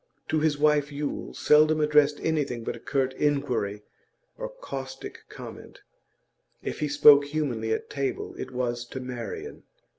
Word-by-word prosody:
To 155 - +2
his 150 -1 +1
wife 150 -1 +3
Yule 145 0 -4
seldom 155 +1 +5
addressed 150 -1 +4
anything 145 -7 -1
but - - -3
a - - -10
curt 135 -2 -1
inquiry 130 -8 0 0.5
or - - -5
caustic 135 - -7
comment; - - -10 0.8
if - - -4
he 150 - 0
spoke 145 0 +7
humanly 140 -7 -2
at - - -1
table 140 -2 -3
it 130 - -4
was 120 -2 -2
to 130 - -7
Marian. 130 - -6
145 Hz, 145 wpm, -27 LUFS, 130-150 Hz, 0.8 s, spoke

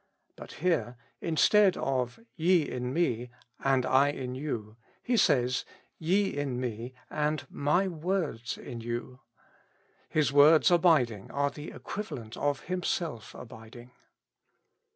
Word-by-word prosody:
But - - -11
here, 160 -8 0 0.2
instead 190 +4 +4
of 130 - -1 0.2
"Ye 170 -1 +3
in 125 0 -3
me 125 -7 0 0.3
and 135 -2 +2
I 135 +2 +4
in 130 -3 -4
you,'''' 120 -6 -5 0.3
He 245 - +1
says, 125 - +3 0.4
"Ye 190 +4 +1
in 140 -4 -2
me 120 0 -5 0.2
and 150 0 -1
my 150 +7 +1
words 165 -8 -2
inyou.^'' 120 +2 -6 0.9
His 150 -3 +1
words 150 +4 +6
abiding 150 - +3
are 140 0 0
the 150 +1 -8
equivalent 125 - -7
of 145 -1 -1
Himself 170 - -3
abiding. 120 +1 -12
140 Hz, 115 wpm, -29 LUFS, 125-165 Hz, 0.9 s, words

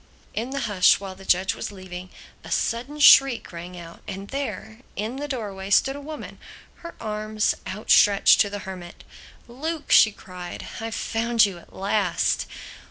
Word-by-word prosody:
In 230 +4 -3
the 275 +1 -3
hush 205 -5 +4
while 195 -1 -7
the 190 +1 -14
judge 185 +2 +2
was - - -6
leaving, 185 -2 -9 0.3
a - - -10
sudden 265 +6 -2
shriek 275 -4 +6
rang 175 +1 -8
out, 170 -1 -11
and 195 +1 -7
there, 265 -5 -5 0.2
in 220 +5 -4
the 290 +1 -4
doorway 205 -8 -5
stood 270 +7 +3
a 285 - -7
woman, 305 +1 -8 0.4
her 340 - -10
arms 215 0 -1
out 210 +3 -4
stretched 200 -1 +6
to 205 - +1
the 205 -1 -7
Hermit. 180 -2 -9 0.4
"Luke!" 300 +6 -5
she 220 - +7
cried, 180 -3 -9
"I've 225 0 -4
found 230 0 +2
you 190 -4 -5
at - - -20
last!" 195 -2 0
210 Hz, 165 wpm, -24 LUFS, 190-240 Hz, 0.4 s, she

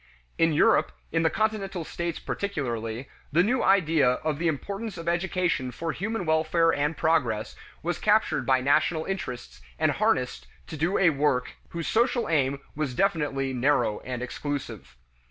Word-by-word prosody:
In 165 0 +4
Europe, 150 - +3 0.2
in 165 - +1
the 165 - +3
Continental 195 -3 -1
states 170 0 -3
particularly, 120 - -3 0.2
the 170 +5 +4
new 245 +5 +1
idea 160 -9 +4
of 155 -2 -1
the 170 - +1
importance 200 +7 -3
of 165 - -7
education 175 -5 0
for 165 +6 -4
human 200 +3 -3
welfare 160 +1 +2
and 150 +2 0
progress 130 -10 +1 0.3
was - - -2
captured - - +2
by 130 +1 +3
national 155 +4 +2
interests 125 - -5 0.2
and - - +2
harnessed - - 0 0.2
to - - -8
do 160 +5 0
a 180 -3 +5
work 140 -3 0 0.2
whose 170 -1 -4
social 240 +1 +2
aim 140 -3 +1 0.2
was 145 -4 -2
definitely 145 -7 0
narrow 125 -4 +1
and 125 -1 -5
exclusive. 120 - -5
155 Hz, 155 wpm, -26 LUFS, 130-175 Hz, 0.3 s, a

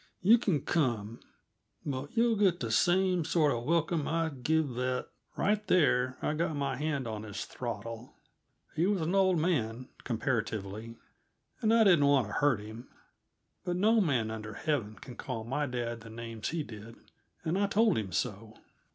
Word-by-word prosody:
You 225 +5 +7
can 175 - +1
come, 120 -9 -1 0.7
but 140 - -5
you'll 230 0 +4
get 195 -4 +3
the 115 -3 -3
same 180 - +3
sort 155 -3 +2
uh 120 - -2
welcome 165 +3 0
I'd 160 -5 -1
give 160 +2 +2
that 125 +1 -2
" - - -34
Right 210 +1 +1
there 130 -8 +3
I - - +1
got 160 0 -1
my 140 -2 -1
hand 140 -2 -2
on 110 -1 -4
his 105 -2 -6
throttle. 115 0 -6 0.6
He 170 +4 +2
was 200 -3 +1
an 160 +3 -1
old 190 -2 +4
man, 130 -8 -1
comparatively, 115 -3 -3 0.6
and 220 - +3
I 230 0 +6
didn't 170 -8 +5
want 140 -4 +4
to - - -6
hurt 135 -7 +2
him; 110 +4 -10 0.7
but 180 -1 -2
no 215 +4 +4
man 125 - +1
under 110 -1 -6
heaven 125 -10 -1
can 120 +4 -11
call 120 -4 -4
my 135 +5 -1
dad 120 -2 -3
the 115 - -11
names 115 -1 -5
he 165 -1 -2
did, 115 -1 -10 0.5
and 165 +1 -1
I 200 +1 +2
told 215 0 +3
him 100 -4 -2
so. 110 0 -3
135 Hz, 175 wpm, -31 LUFS, 115-170 Hz, 0.7 s, You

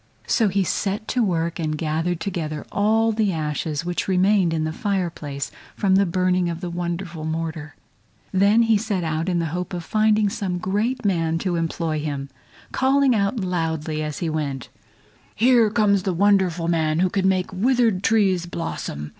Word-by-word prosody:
So 225 -4 +2
he 195 0 +1
set 200 +3 -2
to 250 - +1
work 170 -3 -1
and 155 -2 -1
gathered 160 +3 -1
together 160 -6 -4
all 220 +2 +2
the 215 -2 +1
ashes 155 0 -2
which 175 0 -2
remained 190 -1 +3
in 160 -1 -1
the 155 0 -2
fire 195 -4 -1
place 140 -3 -6 0.2
from 195 -2 +1
the 195 0 +4
burning 180 0 +1
of 170 -1 -4
the 175 0 -5
wonderful 170 -1 -4
mortar. 160 -1 -4 0.6
Then 200 +4 +4
he 225 -2 +3
set 200 -4 -2
out 160 +2 -1
in 175 - +1
the 170 - 0
hope 180 +1 -3
of 175 - -5
finding 215 +2 +2
some 195 -4 -2
great 210 +7 -1
man 165 -4 +1
to 180 -2 0
employ 165 -1 -1
him, 140 -2 -4 0.4
calling 270 0 +3
out 210 +2 0
loudly 160 -4 -2
as 150 -1 -4
he 170 - -2
went 145 -5 -3
along: 105 - -35 0.5
"Here 235 -1 +4
comes 205 -2 +2
the 185 0 -1
wonderful 185 -3 +2
man 160 -2 +1
who 185 - +3
can 190 -1 +2
make 185 0 -1
withered 230 -1 +2
trees 195 -6 +2
blossom! 75 - -5
180 Hz, 180 wpm, -23 LUFS, 160-205 Hz, 0.6 s, the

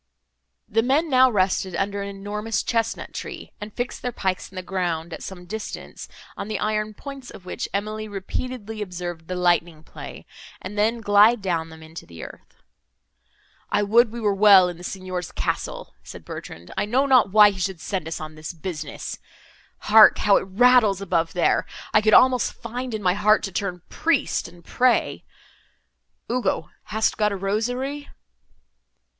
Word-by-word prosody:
The 225 0 +2
men 280 +6 +1
now 260 0 +6
rested 190 -3 0
under 200 +2 -1
an 200 - -4
enormous 205 +3 -3
chesnut 230 -1 -2
tree, - - -7
and 210 +1 -6
fixed 245 +3 -4
their 250 - -2
pikes 190 -5 -2
in - - -16
the 185 - -5
ground, 175 -3 -2
at - - -7
some 180 -2 -8
distance, 215 +4 -7 0.3
on - - -6
the 215 -1 -2
iron 215 0 -1
points 275 -1 -9
of 180 - -12
which - - -4
Emily 215 +2 -3
repeatedly 215 +2 -5
observed 175 -4 -6
the 185 - -3
lightning 175 -3 +1
play, - - -10 0.3
and 190 +3 -8
then 225 +3 +1
glide 210 +3 +5
down 170 -5 -2
them 160 0 -12
into 160 +1 -11
the 85 -2 -10
earth. - - -13 1.1
"I 205 0 +1
would 225 +3 +4
we 235 - -6
were 210 -3 +1
well 195 -2 +7
in 175 - -7
the - - -11
Signor's 185 -2 -5
castle!" - - -3
said - - -11
Bertrand, 85 +2 -9
"I - - 0
know 255 +6 +2
not 255 -6 +5
why 210 0 +7
he 190 - -9
should 185 -1 -2
send 185 -2 -4
us 160 - -4
on 155 0 -7
this 155 +2 -7
business. 160 -3 -6 0.6
Hark! 215 0 +7
how 200 -1 +4
it - - -3
rattles 220 -1 +4
above, 170 -4 -1
there! 175 - +2 0.3
I 215 - +6
could 215 0 +5
almost 255 -1 +5
find 245 +1 -5
in 210 - -5
my 180 -1 +3
heart 210 +2 +3
to 195 - -3
turn 180 -3 -3
priest, 330 0 0
and 175 -1 -16
pray. 255 -1 +1 1.0
Ugo, 235 -9 -1
hast 220 +2 0
got 210 -1 +3
a - - -2
rosary?" 245 +9 -2
205 Hz, 175 wpm, -23 LUFS, 180-225 Hz, 1.1 s, well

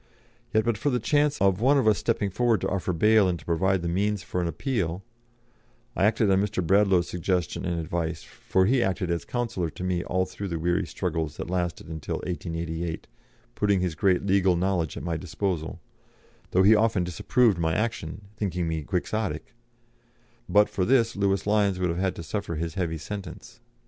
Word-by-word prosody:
Yet 110 0 +2
but 115 -3 0
for 145 - +1
the 125 -2 +1
chance 145 +5 +1
of 95 0 +2
one 140 +4 +4
of 130 - +2
us 105 -2 +4
stepping 105 -4 0
forward 115 0 +2
to - - 0
offer 95 -1 -1
bail 105 +4 +4
and 90 -1 0
to 75 - -15
provide 95 +2 +1
the - - -1
means 100 +3 0
for 90 - -2
an 85 - -1
appeal 95 - -2 0.9
(I - - +2
acted 110 -1 +3
on 95 0 +4
Mr. 100 -3 -1
Bradlaugh's 95 -1 +3
suggestion 90 0 -2
and 85 -2 -1
advice, 80 -1 -3
for 95 0 0
he 125 +5 +3
acted 95 -3 -1
as 85 - -2
counsellor 115 -9 -2
to 90 - -8
me 90 -1 0
all 95 +1 0
through 100 +1 -6
the 85 -3 -3
weary 85 +2 0
struggles 80 -5 -3
that 85 - -5
lasted 90 -2 -2 0.2
till - - -3
1888, 85 -1 -4 0.5
putting 100 -2 +2
his 90 -2 -1
great 90 +3 +1
legal 95 -2 +3
knowledge 85 -4 -1
at - - -6
my 85 -2 -2
disposal, 90 -2 -3 0.7
though 95 - +3
he 105 +3 +7
often 110 -3 +2
disapproved 100 +4 +2
my 80 -1 +1
action, 105 -5 -3
thinking 90 -5 -2
me 80 -1 -2
Quixotic) 100 +8 -3 1.0
but 105 0 +5
for 95 - -2
this, 115 +1 +3
Lewis 100 -1 +1
Lyons 100 -2 +2
would 90 -1 0
have 85 - -3
had 95 0 0
to 85 - -7
suffer 90 +1 -3
his 80 +1 -3
heavy 85 -4 -2
sentence. 95 +2 -8
95 Hz, 190 wpm, -26 LUFS, 85-105 Hz, 1.0 s, he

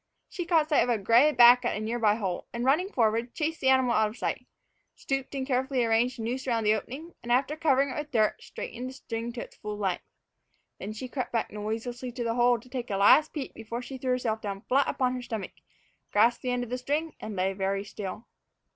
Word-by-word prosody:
She 350 -3 -5
caught 325 -3 +3
sight 300 - +4
of 245 - +1
a 235 - +2
gray 230 +9 +5
back 245 -1 +7
at 240 - -1
a - - -3
near 225 +3 -2
by 210 -2 +4
hole, 190 -5 -3
and, 240 +1 -3
running 315 +9 +3
forward, 230 0 +1
chased 320 0 -2
the 265 - +3
animal 260 -2 +4
out 220 -2 +3
of 220 - -12
sight, - - -3 0.5
stooped 270 0 -3
and 265 -1 -2
carefully 260 -1 +1
arranged 230 +2 +2
the 225 - -5
noose 255 +4 -3
around 230 -3 +1
the 210 0 +4
opening, 270 +10 -6
and, 240 - -5
after 265 +4 +2
covering 280 -3 +2
it 255 - -4
with 300 0 -5
dirt, 215 -3 +1
straightened 250 +2 -6
the - - -9
string 230 -3 -5
to 240 - -5
its - - -11
full 210 0 -6
length. 190 -4 -1 0.8
Then 200 - -5
she 215 +4 -6
crept 255 0 -4
back 230 -2 -1
noiselessly 230 +4 -4
to 245 -1 -3
the 230 -1 0
hole 240 0 +3
to 235 - -18
take 250 -1 -5
a 195 - -1
last 250 +10 +6
peep 285 -4 -5
before 230 +2 -6
she 260 +1 -8
threw 255 - -3
herself 235 -3 0
down 200 -1 -5
flat 270 +5 +2
upon 255 -1 0
her 250 - -4
stomach, 225 -5 -5 0.6
grasped 230 +3 +3
the 255 - -3
end 245 0 0
of 245 - -8
the 250 - -2
string, 295 +5 -2
and 215 -1 -6
lay 190 +1 0
very 195 +1 -1
still. 205 +2 -7
245 Hz, 240 wpm, -28 LUFS, 220-265 Hz, 0.8 s, back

